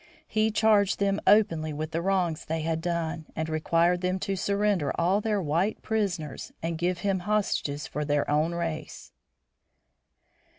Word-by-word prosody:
He 215 0 +1
charged 210 -2 +3
them 200 0 0
openly 165 -8 +4
with 155 +2 -4
the 165 - -1
wrongs 180 -4 0
they 160 0 -2
had 160 0 -1
done, 165 -2 -2
and 160 0 -2
required 165 +3 +2
them 185 0 0
to 195 - -1
surrender 200 -5 +1
all 185 +5 +2
their 210 -1 0
white 175 +5 0
prisoners 185 -10 -2
and 165 0 -1
give 175 +2 -1
him 195 -2 +1
hostages 180 -7 -1
from 150 0 -4
their 145 -1 +1
own 155 +3 +1
race. 165 -2 -5
170 Hz, 155 wpm, -27 LUFS, 160-200 Hz, -, openly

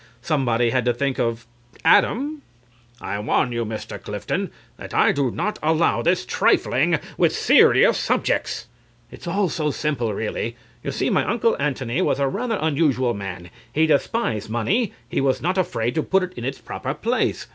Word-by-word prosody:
Somebody 120 -5 +1
had 125 0 +1
to 120 -1 +2
think 140 +1 -1
of 115 0 -1 0.4
Adam. 285 - +3 0.6
CRAWSHAW. - - -9
I 100 +1 -3
warn 110 +3 +1
you, 120 0 -1
Mr. 110 0 -6
Clifton, - - -3 0.3
that - - -8
I - - +5
do 140 -3 0
not 210 - -3
allow 160 +2 +2
this 175 -6 +1
trifling - - +2 0.2
with - - +4
serious - - +5
subjects. - - 0
CLIFTON. 120 - -20 0.5
It's - - -12
all 195 +3 +1
so 155 -2 -1
simple, 140 -6 -1
really.... 115 +2 -3 0.3
You - - -3
see, - - -1
my - - +3
Uncle 230 +1 +2
Antony 135 0 -1
was 140 - +1
a 140 - +2
rather 225 - -2
unusual 140 -6 +1
man. 95 -4 -7 0.2
He 160 +4 +3
despised 145 - 0
money. 185 - 0 0.2
He - - -1
was 135 -1 +1
not 180 +4 0
afraid 120 -10 -1
to 160 - +1
put 190 +4 +1
it 185 0 -5
in 120 - -6
its 135 +1 -3
proper 135 +2 -5
place. 235 +10 -1
140 Hz, 180 wpm, -22 LUFS, 120-175 Hz, 0.6 s, I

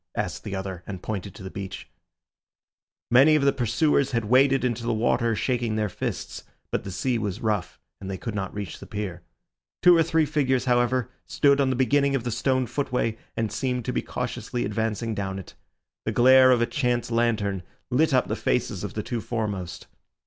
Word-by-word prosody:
asked - - -3
the 100 - -4
other, 95 -2 -5
and 95 -3 -7
pointed 100 -3 -4
to - - -10
the 95 - -7
beach. 95 -1 -7 1.2
Many 135 +6 +7
of 150 - +2
their 140 - +5
pursuers 135 +3 +1
had 115 -2 0
waded 130 +3 +4
into 120 -1 -1
the 115 0 -1
water 115 0 +1
shaking 120 -2 -1
their 105 -1 0
fists, - - -5 0.3
but - - -1
the - - -6
sea 120 +6 -1
was 100 -4 -3
rough, 105 -5 -2 0.2
and 95 - -7
they 95 - -3
could 115 +3 -5
not 95 -2 -3
reach 100 -5 -6
the - - -11
pier. 95 -4 -5 0.6
Two 180 -1 +8
or 165 - +5
three 160 -1 +2
figures, 135 -4 +1
however, 125 0 +1 0.2
stood 140 -1 +3
on 135 - +2
the 130 - +1
beginning 140 +2 +2
of 130 - -1
the 120 - -2
stone 130 +3 +1
footway, 125 -4 -1 0.2
and 110 -2 -1
seemed 125 -3 -2
to - - -2
be - - 0
cautiously 120 - -3
advancing 110 +2 -2
down 95 -2 -3
it. 95 - -9 0.5
The - - 0
glare 130 +1 +7
of 125 -2 +4
a - - +3
chance 120 -1 -1
lantern 110 -5 +1 0.3
lit 155 +6 +3
up 130 -2 +3
the - - -1
faces - - -1
of - - -5
the - - -2
two 120 -2 -3
foremost. 100 -7 -4
120 Hz, 200 wpm, -25 LUFS, 105-130 Hz, 1.2 s, Two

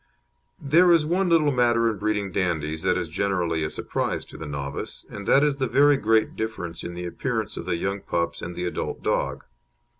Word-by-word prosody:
There 170 +6 +5
is 165 -3 +4
one 180 +3 +1
little 155 -3 +4
matter 120 -2 +3
in 110 -2 -1
breeding 105 -2 -1
Dandies 80 -5 -1
that 90 +1 +2
is 85 -2 -2
generally 85 -2 -1
a 75 - -1
surprise - - -2
to - - -14
the 80 - -6
novice, 70 -1 -3
and 100 -1 -8
that 140 - +5
is 145 -2 +2
the 135 -1 0
very 140 +5 +5
great 110 -3 +2
difference 110 -7 -4
in 85 - -6
the 90 0 -5
appearance 85 - -3
of - - -6
the 85 - -1
young 95 +3 -2
pups 85 0 -2
and 85 0 -6
the 90 - -3
adult 90 - -4
dog. - - -1
100 Hz, 205 wpm, -25 LUFS, 85-135 Hz, -, There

